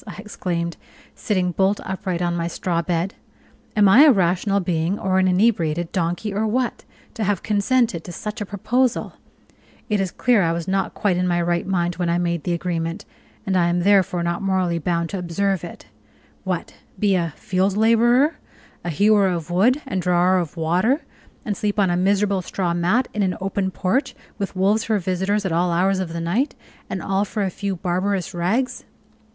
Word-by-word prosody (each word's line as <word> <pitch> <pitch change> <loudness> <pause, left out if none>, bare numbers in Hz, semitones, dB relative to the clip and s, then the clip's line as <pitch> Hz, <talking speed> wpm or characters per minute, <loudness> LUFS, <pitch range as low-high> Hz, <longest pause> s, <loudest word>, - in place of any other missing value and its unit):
I - - -7
exclaimed, 175 -5 -4 0.4
sitting 185 -6 -1
bolt 195 +3 +1
upright 185 -2 -3
on 175 0 0
my 170 0 -1
straw 170 0 -1
bed, 170 +2 -1 0.6
"am 210 -2 +5
I 225 +8 +7
a 300 - +8
rational 190 0 +2
being 175 +1 -1
or 190 0 +1
an 185 - +3
inebriated 175 -4 +1
donkey, 180 +3 -2
or 215 +2 0
what, 245 +2 -1 0.3
to 220 - -3
have 205 -3 0
consented 210 -3 +1
to 180 - -7
such 210 +4 -6
a - - -2
proposal? 240 +5 0 0.8
It 210 -1 +1
is 190 - -1
clear 235 +3 +2
that 165 - +2
I - - +1
was 170 +1 -4
not 190 0 -1
quite 195 -4 +1
in 180 0 +1
my 175 -1 +1
right 175 +1 0
mind 175 -2 0
when 175 -2 -1
I 170 - +2
made 170 -3 -1
the 175 - 0
agreement, 170 +2 -3 0.4
and 190 -2 0
I 175 -2 +3
am 175 +1 +1
therefore 185 -2 +3
not 170 +2 -1
morally 185 -3 0
bound 170 0 -1
to 195 - -3
observe 190 +2 -1
it. - - -9 0.6
What! - - -3 0.2
be 205 -2 +2
a 170 -5 -1
field 190 +2 0
laborer, 240 +7 +4 0.5
a 175 - -3
hewer 205 +4 +4
of 175 -2 -3
wood 245 +11 +3
and 190 -8 -2
drawer 180 +1 +3
of 170 -1 -5
water, 180 - +1 0.4
and 210 -4 -1
sleep 205 +1 -2
on 190 -3 +3
a - - +1
miserable 195 +1 +1
straw 180 -1 -2
mat 185 +9 +1
in 210 - -1
an 185 -2 0
open 195 0 -1
porch, 200 +9 -1 0.2
with 195 -1 -3
wolves 200 +4 +2
for 220 -2 +1
visitors 190 +2 -1
at 190 - -1
all 175 +2 +1
hours 185 +3 +2
of 185 -3 -3
the 170 - -4
night, 205 - 0 0.3
and - - -4
all 195 +1 +1
for 210 0 -2
a 190 - -1
few 200 +1 -3
barbarous 185 +1 -1
rags! 200 +10 -1
190 Hz, 195 wpm, -22 LUFS, 175-205 Hz, 0.8 s, a